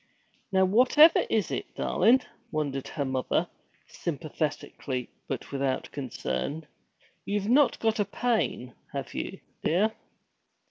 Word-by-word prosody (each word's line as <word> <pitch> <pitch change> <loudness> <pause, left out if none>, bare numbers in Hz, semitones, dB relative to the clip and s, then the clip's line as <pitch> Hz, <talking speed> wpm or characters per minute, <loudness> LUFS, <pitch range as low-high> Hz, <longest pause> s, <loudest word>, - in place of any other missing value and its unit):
'Now, 190 -1 +4
whatever 255 - +6
is - - +1
it, - - -4
darlin'?' 255 +3 +3 0.3
wondered 140 -3 -2
her 140 - -3
mother, 130 -1 0 0.4
sympathetically 150 -4 -4 0.2
but - - -5
without 135 -1 -1
concern. 140 - -3 0.6
'You've 205 0 -1
not 275 +2 +5
got 225 -1 0
a 205 - +3
pain, 205 - -1 0.2
have - - -4
you, - - -5 0.2
dear?' 205 +7 +2
160 Hz, 110 wpm, -28 LUFS, 140-220 Hz, 0.6 s, whatever